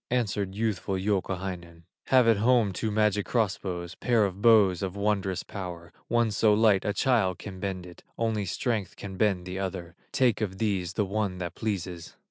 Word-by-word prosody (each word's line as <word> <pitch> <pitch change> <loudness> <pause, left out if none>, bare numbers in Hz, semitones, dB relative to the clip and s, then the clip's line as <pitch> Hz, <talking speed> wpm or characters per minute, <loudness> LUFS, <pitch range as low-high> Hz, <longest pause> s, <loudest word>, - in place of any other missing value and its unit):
Answered 100 -5 -1
youthful 105 -3 -1
Youkahainen: 95 -3 -3 0.2
"Have 130 -3 +5
at 115 -2 +5
home 115 -2 +3
two 110 +4 -2
magic 105 -1 +1
cross 110 -5 +1
bows, 90 -2 -5
Pair 115 -2 +2
of 100 0 -5
bows 105 -6 +5
of 95 -1 -3
wondrous 100 -2 0
power, 85 -4 -7
One 120 -1 +2
so 105 0 +3
light 105 -3 +4
a 105 - 0
child 105 -6 +2
can 95 0 -8
bend 95 -2 -4
it, 90 -1 -13 0.2
Only 110 -3 0
strength 105 0 -2
can 100 -1 -8
bend 95 -3 +1
the 95 +1 -5
other, 95 -3 -4 0.2
Take 125 -5 +2
of 95 -3 -2
these 95 -5 -1
the 105 - 0
one 100 -1 -2
that 85 -2 -4
pleases." 90 -6 -4
100 Hz, 180 wpm, -27 LUFS, 90-110 Hz, 0.2 s, Have